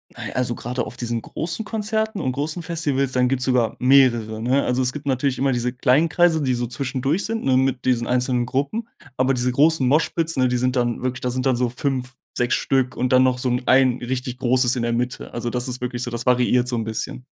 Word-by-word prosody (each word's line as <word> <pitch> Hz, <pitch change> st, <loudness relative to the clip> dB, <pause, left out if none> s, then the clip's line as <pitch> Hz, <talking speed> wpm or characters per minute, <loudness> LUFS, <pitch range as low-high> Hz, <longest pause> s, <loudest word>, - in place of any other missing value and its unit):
Nein, -, -, -6 dB
also, 125 Hz, -2 st, -1 dB
grade 125 Hz, +1 st, -3 dB
auf -, -, -9 dB
diesen 120 Hz, -1 st, -3 dB
großen 165 Hz, -, -3 dB
Konzerten 220 Hz, -1 st, -2 dB
und 130 Hz, -, -1 dB
großen 155 Hz, +6 st, -3 dB
Festivals, 145 Hz, -5 st, -1 dB
dann 125 Hz, -1 st, +2 dB
gibt's 130 Hz, 0 st, 0 dB
sogar 125 Hz, -4 st, +1 dB
mehrere, 120 Hz, -5 st, +3 dB
ne? 130 Hz, +4 st, +2 dB
Also, 125 Hz, +1 st, 0 dB
es 125 Hz, 0 st, 0 dB
gibt 150 Hz, -1 st, -8 dB
natürlich 135 Hz, 0 st, 0 dB
immer 135 Hz, +1 st, +1 dB
diese 125 Hz, 0 st, -1 dB
kleinen 130 Hz, +5 st, +3 dB
Kreise, 165 Hz, 0 st, +2 dB
die 130 Hz, -3 st, +1 dB
so 120 Hz, 0 st, -1 dB
zwischendurch 135 Hz, -, -2 dB
sind, 225 Hz, +1 st, -3 dB
ne, 130 Hz, -1 st, +3 dB
mit 130 Hz, -1 st, 0 dB
diesen 120 Hz, -2 st, +1 dB
einzelnen 125 Hz, 0 st, +1 dB
Gruppen. 140 Hz, -, -2 dB, 0.3 s
Aber 130 Hz, +1 st, +2 dB
diese 125 Hz, 0 st, 0 dB
großen 145 Hz, +2 st, +3 dB
Moshpits 160 Hz, +4 st, +1 dB
ne, 130 Hz, -1 st, +3 dB
die 125 Hz, 0 st, 0 dB
sind 125 Hz, +1 st, 0 dB
dann 120 Hz, -1 st, -1 dB
wirklich 130 Hz, 0 st, -2 dB
da 125 Hz, -, -2 dB
sind 130 Hz, +1 st, -2 dB
dann 130 Hz, -2 st, +2 dB
so 125 Hz, 0 st, +1 dB
5, 130 Hz, 0 st, -3 dB, 0.2 s
6 120 Hz, 0 st, +1 dB
Stück 130 Hz, -1 st, 0 dB
und 125 Hz, 0 st, -1 dB
dann 130 Hz, 0 st, +6 dB
noch 130 Hz, -1 st, +2 dB
so 125 Hz, 0 st, -1 dB
'n 125 Hz, +1 st, -1 dB
ein 130 Hz, -1 st, +4 dB
richtig 125 Hz, 0 st, -4 dB
großes 125 Hz, 0 st, +2 dB
in 120 Hz, -, -1 dB
der 120 Hz, 0 st, 0 dB
Mitte. 125 Hz, +2 st, -3 dB
Also 120 Hz, 0 st, -3 dB
das 125 Hz, +1 st, -3 dB
ist 125 Hz, -1 st, -5 dB
wirklich 125 Hz, 0 st, -3 dB
so, 120 Hz, -, -4 dB
das 120 Hz, 0 st, -4 dB
variiert 125 Hz, 0 st, +3 dB
so 125 Hz, -, -1 dB
'n 115 Hz, -, -1 dB
bisschen. 110 Hz, +3 st, -5 dB
125 Hz, 240 wpm, -22 LUFS, 125-135 Hz, 0.3 s, dann